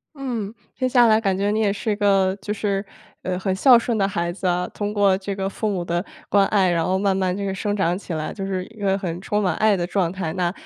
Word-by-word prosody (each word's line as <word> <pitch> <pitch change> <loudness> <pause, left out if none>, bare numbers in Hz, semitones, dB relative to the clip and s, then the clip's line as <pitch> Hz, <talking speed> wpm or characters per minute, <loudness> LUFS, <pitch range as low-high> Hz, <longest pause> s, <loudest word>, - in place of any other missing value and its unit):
嗯， 235 -7 -4 0.2
听 255 - 0
下 250 -2 +5
来 220 -1 +5
感 195 -4 0
觉 200 +1 0
你 215 - 0
也 205 -2 +2
是 210 +2 -3
一 205 - 0
个 195 -2 +2
就 210 - -3
是， 200 -1 -1 0.4
呃， 185 -1 -2
很 190 0 -1
孝 245 +5 +6
顺 235 0 -1
的 195 -2 +2
孩 170 -3 -2
子 185 +2 -5
啊， 180 0 0
通 205 0 -4
过 200 -2 +3
这 195 +1 -4
个 195 0 -2
父 210 +2 -2
母 185 -3 -2
的 175 +1 -2 0.2
关 200 -1 +4
爱， 195 -3 +3
然 170 -1 +1
后 185 +2 +1
慢 195 -1 +1
慢 185 -1 0
这 200 +1 -3
个 195 - -2
生 205 +2 -2
长 180 -4 +1
起 195 - -7
来 155 -1 -3
就 195 - -5
是 190 -1 -2
一 220 - -17
个 195 -1 +1
很 175 -4 -4
充 210 +1 0
满 185 -4 +1
爱 215 -1 +3
的 175 -3 -1
状 180 -2 0
态， 185 -4 -3
那 180 -2 0
195 Hz, 295 characters per minute, -22 LUFS, 185-210 Hz, 0.4 s, 孝